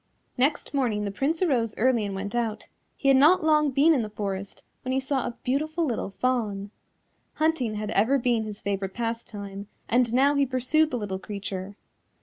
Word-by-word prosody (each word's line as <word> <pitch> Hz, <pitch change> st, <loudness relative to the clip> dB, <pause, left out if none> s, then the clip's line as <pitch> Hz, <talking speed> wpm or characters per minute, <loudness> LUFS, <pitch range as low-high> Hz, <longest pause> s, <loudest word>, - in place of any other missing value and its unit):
Next 285 Hz, +4 st, 0 dB
morning 230 Hz, -7 st, 0 dB
the 200 Hz, -, -2 dB
Prince 305 Hz, -, 0 dB
arose 240 Hz, -10 st, +1 dB
early 240 Hz, -1 st, +2 dB
and 195 Hz, -, -5 dB
went 200 Hz, +2 st, -4 dB
out; 230 Hz, -3 st, -2 dB, 0.3 s
he 275 Hz, -, -2 dB
had 270 Hz, -, +6 dB
not 310 Hz, +6 st, +5 dB
long 305 Hz, -1 st, +4 dB
been 285 Hz, +5 st, +4 dB
in 270 Hz, -, +2 dB
the 215 Hz, -, -4 dB
forest 200 Hz, -2 st, -5 dB, 0.2 s
when 255 Hz, -, -3 dB
he 265 Hz, -, +2 dB
saw 265 Hz, -1 st, -1 dB
a 240 Hz, -, -6 dB
beautiful 310 Hz, +6 st, 0 dB
little 235 Hz, -7 st, -2 dB
Fawn. 205 Hz, -3 st, -1 dB, 0.6 s
Hunting 310 Hz, -9 st, +1 dB
had 210 Hz, 0 st, -3 dB
ever 225 Hz, +8 st, +3 dB
been 240 Hz, -3 st, +1 dB
his 210 Hz, -1 st, -7 dB
favourite 195 Hz, -1 st, -2 dB
pastime, 210 Hz, -4 st, -5 dB, 0.2 s
and 240 Hz, 0 st, +2 dB
now 270 Hz, +4 st, +4 dB
he 280 Hz, -1 st, +3 dB
pursued 265 Hz, +4 st, +2 dB
the 250 Hz, -, -2 dB
little 200 Hz, -4 st, -4 dB
creature. 200 Hz, -1 st, -6 dB
240 Hz, 185 wpm, -26 LUFS, 205-275 Hz, 0.6 s, had